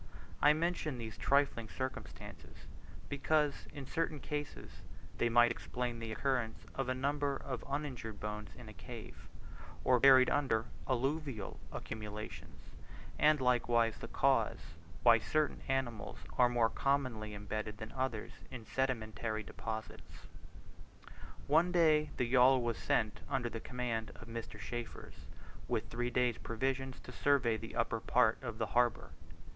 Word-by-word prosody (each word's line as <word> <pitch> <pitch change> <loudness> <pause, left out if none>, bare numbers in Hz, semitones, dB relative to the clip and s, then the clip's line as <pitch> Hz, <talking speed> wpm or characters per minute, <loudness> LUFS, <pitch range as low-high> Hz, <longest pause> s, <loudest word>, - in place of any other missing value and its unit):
I 150 - +7
mention 160 -3 -1
these 110 -2 -6
trifling 140 -5 +2
circumstances, 130 0 -7 0.4
because 145 +1 +1
in 140 -2 -7
certain 155 +2 -1
cases 145 +1 -6 0.4
they 120 - +3
might 120 0 +6
explain 120 0 -3
the 115 -1 -5
occurrence 125 -2 -1
of 135 -1 -2
a 130 - +1
number 140 +1 0
of 125 -3 -5
uninjured 130 -7 -4
bones 105 0 -5
in 120 -3 -10
a 110 - -9
cave, 120 -2 -10 0.6
or 125 -1 +4
buried 130 -1 +8
under 130 -6 +2 0.2
alluvial 135 -3 -1
accumulations; 105 -1 -7 0.5
and 150 0 +5
likewise 120 -3 +2
the - - -6
cause - - +2 0.5
why 115 -1 +7
certain 155 +5 0
animals 125 -5 -2 0.2
are 125 -1 +5
more 120 -2 +2
commonly 130 -7 0
embedded 105 +1 -4
than 110 0 -7
others 130 -5 -2 0.2
in 120 -4 -8
sedimentary 110 -4 -1
deposits. 110 +2 -7 1.2
One 165 +5 +4
day 155 -4 +4
the 125 - +2
yawl 130 +1 +5
was 120 -1 -1
sent 110 -3 +1
under 130 -4 0
the 115 - -5
command 115 -3 -3
of 115 - -12
Mr. 115 0 -6
Chaffers 120 -1 -7 0.4
with - - -2
three 120 +1 -1
days' 125 0 +1
provisions 130 +3 -2
to - - -10
survey 125 -4 +2
the 115 +1 -7
upper 115 - 0
part 110 -1 +3
of 115 -4 -5
the 110 - 0
harbour. 120 -1 +2
125 Hz, 140 wpm, -34 LUFS, 115-135 Hz, 1.2 s, buried